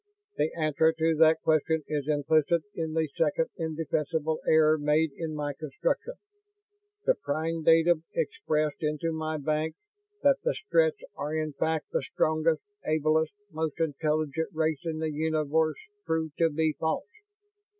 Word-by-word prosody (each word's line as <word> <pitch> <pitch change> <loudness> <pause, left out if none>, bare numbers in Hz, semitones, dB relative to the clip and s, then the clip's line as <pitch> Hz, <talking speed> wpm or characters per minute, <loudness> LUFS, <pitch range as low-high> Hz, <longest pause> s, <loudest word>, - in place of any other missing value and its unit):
"The 155 - +1
answer 160 0 +3
to 160 0 +1
that 160 0 +5
question 160 0 +2
is 150 -2 -2
implicit 155 +2 +2
in 160 -2 -3
the 160 -1 +1
second 160 0 +1
indefensible 160 -1 -1
error 155 0 +5
made 150 +1 +2
in 160 -2 -4
my 145 -1 -2
construction. - - -2 0.9
The - - +5
prime 160 - -2
datum 165 +1 +4
impressed 155 - -1
into 150 +1 -1
my 155 0 -2
banks, 155 +2 -1 0.5
that 280 -1 +5
the - - +1
Stretts 165 0 +1
are 150 +2 -3
in 155 -1 -2
fact 160 +1 -1
the - - 0
strongest, 155 +3 +1 0.2
ablest, 155 +1 +1 0.2
most 155 -1 -3
intelligent 155 0 0
race 155 -2 0
in 160 -1 -2
the 160 0 -2
universe, 155 0 +1 0.3
proved 160 -2 -1
to 165 -1 +4
be 160 0 +1
false. 160 0 -1
160 Hz, 140 wpm, -28 LUFS, 155-160 Hz, 0.9 s, that